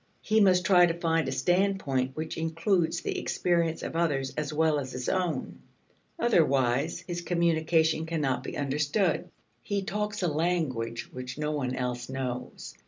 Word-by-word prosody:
He 220 0 +3
must 185 -2 +4
try 180 -3 +6
to 170 0 -3
find 165 -3 +1
a - - -1
standpoint 150 -6 +1
which 155 +1 -4
includes 165 +1 0
the - - -2
experience 170 -2 0
of - - -5
others 140 -5 0
as 150 -1 -2
well 155 -1 +2
as 130 -2 -6
his 125 0 -4
own. 180 -3 -1 0.6
Otherwise 145 - +2
his 175 0 -5
communication 160 -2 +1
cannot 150 -6 0
be - - -6
understood. 150 +6 0 0.3
He 200 - -2
talks 210 0 -3
a - - +3
language 150 -8 -1
which 125 +1 -6
no 150 0 -1
one 130 -4 -2
else 125 -1 -3
knows. 130 -2 -5
160 Hz, 155 wpm, -28 LUFS, 135-175 Hz, 0.6 s, try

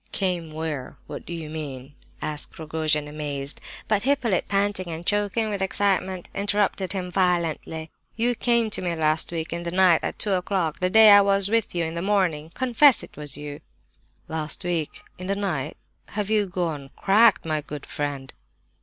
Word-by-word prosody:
_" - - -39
"Came 180 -4 -2
where? 155 -4 -4
What - - -8
do - - -7
you 165 -2 -5
mean?" 145 -3 -7 0.3
asked 150 -1 -3
Rogojin, 155 -1 -1
amazed. 145 -2 -2 0.3
But 210 -2 +2
Hippolyte, 250 -7 +1
panting 200 -2 0
and 165 +1 -6
choking 205 +2 0
with 200 -2 -3
excitement, 190 -2 0
interrupted 200 -2 0
him 180 -2 -4
violently. 170 -3 0 0.2
"You 240 +2 +2
came 235 -2 +2
to - - -1
me 175 -2 -1
last 155 0 +1
week, 165 -1 -3
in 170 - -3
the 170 - -4
night, 180 -2 +5
at - - -3
two 205 - 0
o'clock, 180 -3 -1
the 185 - +1
day 220 +1 +8
I 205 0 +9
was 200 0 +3
with 225 -5 +1
you 170 - +1
in 160 - -4
the 170 - -3
morning! 180 -6 +1
Confess 260 +1 +5
it - - -12
was 145 -2 -5
you!" 145 0 -7 0.7
"Last 155 -1 -3
week? 170 -4 -2 0.2
In 185 - -6
the 195 - 0
night? 160 -8 -2 0.4
Have 210 0 -2
you 210 -2 +3
gone 165 -6 -3
cracked, 220 +2 +4
my 155 -1 -1
good 145 0 -8
friend?" 140 -3 -4
175 Hz, 180 wpm, -25 LUFS, 155-200 Hz, 0.7 s, I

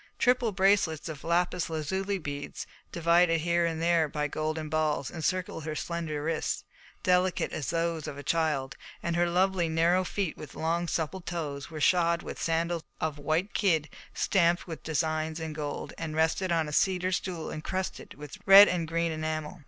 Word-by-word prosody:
Triple 250 -2 +3
bracelets 190 -5 +2
of 150 -3 -7
lapis 175 +1 0
lazuli 190 +6 -2
beads, 145 -4 -6 0.3
divided 170 -1 +3
here 170 +1 +2
and 165 -1 -3
there 165 -1 +3
by 150 0 -1
golden 155 +1 -3
balls, 155 -2 0
encircled 175 0 -2
her 155 -1 -3
slender 160 -3 -3
wrists, 160 0 -1 0.4
delicate 180 0 +2
as 145 - -3
those 165 -2 -1
of 140 - -6
a 145 - -7
child; 150 -4 0 0.3
and 170 -1 -1
her 175 0 +2
lovely, 180 -1 +2
narrow 170 +3 +3
feet 185 -2 -2
with 150 - -10
long, 170 +2 -1
supple 165 +3 -2
toes, 155 -5 -5
were 160 -2 -7
shod 170 +1 +3
with - - -7
sandals 165 +1 0 0.2
of 155 -2 -2
white 160 +7 0
kid 160 -7 +2 0.2
stamped 175 -2 +2
with 165 -3 -7
designs 155 0 -1
in 160 -1 -4
gold, 150 -1 -5
and 160 -1 -4
rested 160 +3 +1
on 165 -2 +1
a 150 - -6
cedar 185 +2 +2
stool 175 -2 -3
incrusted 185 +4 -4
with 145 0 -10
red 195 +1 +11
and 170 -3 -1
green 165 +1 0
enamel. 155 +1 -3
165 Hz, 170 wpm, -29 LUFS, 155-175 Hz, 0.4 s, red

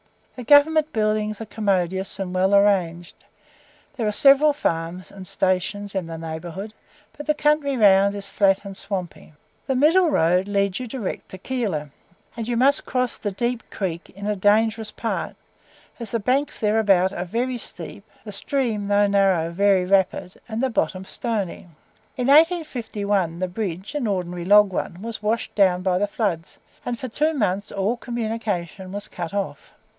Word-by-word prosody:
The 250 - -7
Government 300 +4 +5
buildings 215 -1 0
are 225 - -5
commodious 190 -3 -1
and 190 -2 -4
well 190 +2 +3
arranged. 180 -4 +2 0.8
There 225 -4 -1
are - - +1
several 280 +6 +5
farms 165 - -3
and 190 -2 -9
stations 190 +3 -1
in 190 -4 -2
the 165 0 -6
neighbourhood, 165 +6 -6 0.4
but 295 - -9
the 300 - +2
country 295 -2 +1
round 200 -2 +5
is 200 -1 -6
flat 195 0 +2
and 195 -1 -7
swampy. 185 -6 -6 0.3
The 265 - 0
middle 325 +6 +4
road 180 - +2
leads 200 0 0
you 255 - -5
direct 225 -4 -5
to 190 - -9
Keilor, 190 - -3 0.4
and 230 -1 -5
you 240 -1 -1
must 275 +4 +3
cross 250 -1 -1
the 205 - -3
Deep 235 +4 -3
Creek 175 -4 -4
in 200 +2 -9
a 210 0 0
dangerous 215 +2 +2
part, 225 +1 -4 0.6
as 235 - -6
the 230 - -1
banks 260 +7 0
thereabouts 200 -4 +2
are 175 - -3
very 245 +6 -2
steep, 205 - -8 0.2
the 210 - -8
stream 220 -1 -2
(though 205 0 +3
narrow) 195 -5 +2
very 195 0 +3
rapid, 185 -1 0
and 225 +3 -2
the 265 - +1
bottom 185 -2 -1
stony. 205 -6 -4 0.5
In 250 - -1
1851, 235 - +2
the 185 +1 -1
bridge 190 - -5
(an 290 -6 -1
ordinary 180 -3 -3
log 205 0 +6
one) 180 +2 -4
was 230 -2 -6
washed 220 +2 -1
down 185 -3 +3
by 185 -1 +1
the 205 - +1
floods, 195 -6 -3 0.3
and 240 -1 -3
for 255 - -5
two 305 +7 0
months 200 -4 -1
all 200 +4 0
communication 215 -6 -4
was 205 +1 -5
cut 175 +1 -6
off. 200 -1 -4
205 Hz, 170 wpm, -23 LUFS, 185-235 Hz, 0.8 s, log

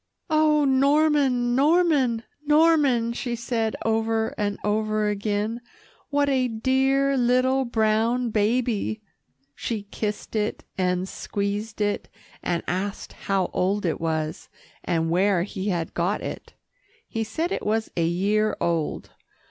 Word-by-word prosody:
"Oh, 305 -1 +4
Norman, 275 -2 +3
Norman, 280 -5 +3 0.2
Norman," 295 -6 +3
she 240 0 -3
said 225 -1 -1
over 225 0 0
and 205 -1 -1
over 215 0 0
again, 210 +3 -2 0.5
"what 285 0 +2
a 260 -2 +2
dear 265 +4 +2
little 255 +1 +2
brown 225 +1 +1
baby!" 220 0 0 0.5
She 215 - -4
kissed 210 +1 -5
it, 215 0 -1
and 180 0 0
squeezed 205 +3 -4
it, 205 0 -1 0.3
and 170 -1 -1
asked 195 +3 -3
how 195 -2 -1
old 195 +2 0
it 165 - -1
was, 160 -1 -2 0.3
and 165 -2 0
where 185 0 +3
he 195 0 -5
had 170 -3 -2
got 175 +4 0
it. - - -7 0.5
He 225 -1 -2
said 320 - -2
it - - -2
was 220 +1 -1
a 170 - +1
year 205 +5 +1
old. 165 -3 -1
220 Hz, 125 wpm, -24 LUFS, 200-260 Hz, 0.5 s, Oh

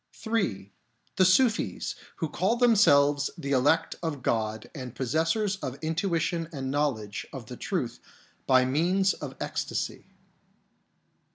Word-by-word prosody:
III. 195 - -1 0.5
The 185 - +5
Sufis, 225 +5 +2 0.2
who 165 - -2
call 190 +8 0
themselves 145 - +4
the 140 - -4
elect 145 +5 +2
of 155 -6 -4
God 110 0 -1
and 130 -4 -7
possessors 165 - 0
of 130 -7 -5
intuition 165 0 -1
and 135 -4 -4
knowledge 125 -9 -1
of - - -8
the - - -8
truth - - -3 0.5
by 130 -1 +5
means 180 +8 +2
of - - -7
ecstasy. - - -3
155 Hz, 120 wpm, -28 LUFS, 130-185 Hz, 0.5 s, The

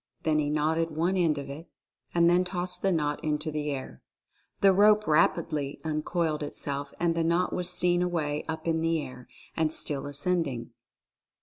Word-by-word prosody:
Then 155 -1 +2
he 145 -1 0
knotted 160 +2 +1
one 165 +4 0
end 165 -5 +2
of 140 - -5
it 145 +5 -9 0.4
and 170 -1 +3
then 175 +1 +4
tossed 180 0 -2
the 195 - +2
knot 150 -4 -1
into 150 +1 -1
the 150 0 -2
air. 130 - -6 0.6
The 195 -1 +6
rope 210 +2 +5
rapidly 150 -2 +1
uncoiled 155 0 -1
itself, 140 -1 -4
and 170 -1 +2
the 165 0 0
knot 170 +2 +1
was 180 -1 +1
seen 175 -1 +2
away 155 -4 -1
up 160 0 -5
in 160 -1 +1
the 165 0 +1
air, 130 -3 -8 0.3
and 160 -2 +1
still 145 -3 0
ascending. 145 -5 -1
160 Hz, 175 wpm, -28 LUFS, 150-175 Hz, 0.6 s, The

